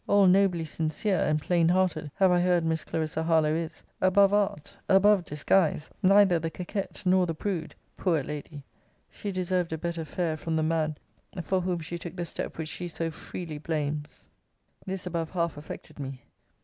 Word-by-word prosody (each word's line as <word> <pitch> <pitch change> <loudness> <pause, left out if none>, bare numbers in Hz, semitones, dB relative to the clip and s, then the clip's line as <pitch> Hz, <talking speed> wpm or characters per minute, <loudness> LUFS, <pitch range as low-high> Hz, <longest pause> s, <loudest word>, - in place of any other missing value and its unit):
All 200 -1 +5
nobly 185 -3 +4
sincere, 160 +6 -1
and 150 0 +2
plain 170 +1 +2
hearted, 175 -4 +1
have 190 -2 +4
I 175 - +4
heard 175 -2 +2
Miss 160 -1 0
Clarissa 160 0 -2
Harlowe 160 -2 +3
is: 165 0 -4 0.2
above 195 +2 +5
art, 205 -5 0
above 195 -1 +5
disguise; 150 +1 +1
neither 195 -2 +5
the 165 0 -2
coquette, 190 +5 -5
nor 185 0 +4
the 165 - -2
prude! 170 -2 -3 0.2
Poor 165 -7 +1
lady! 150 0 -7 0.5
she 205 - -5
deserved 180 -2 -1
a 160 - -1
better 170 0 -3
fare 160 0 -2
from 160 +1 -3
the 160 - +1
man 155 -1 0 0.5
for 190 +2 +1
whom 180 -1 -1
she 170 +2 -5
took 175 0 -7
the 175 -2 -3
step - - -5
which 160 -1 -4
she 175 +2 -5
so 165 -1 -3
freely 160 -1 -7
blames! 150 -1 -3 0.6
This 190 -1 -4
above 165 -2 -2
half 170 -3 -1
affected 150 0 -9
me. 135 -2 -6
170 Hz, 175 wpm, -28 LUFS, 155-185 Hz, 0.6 s, All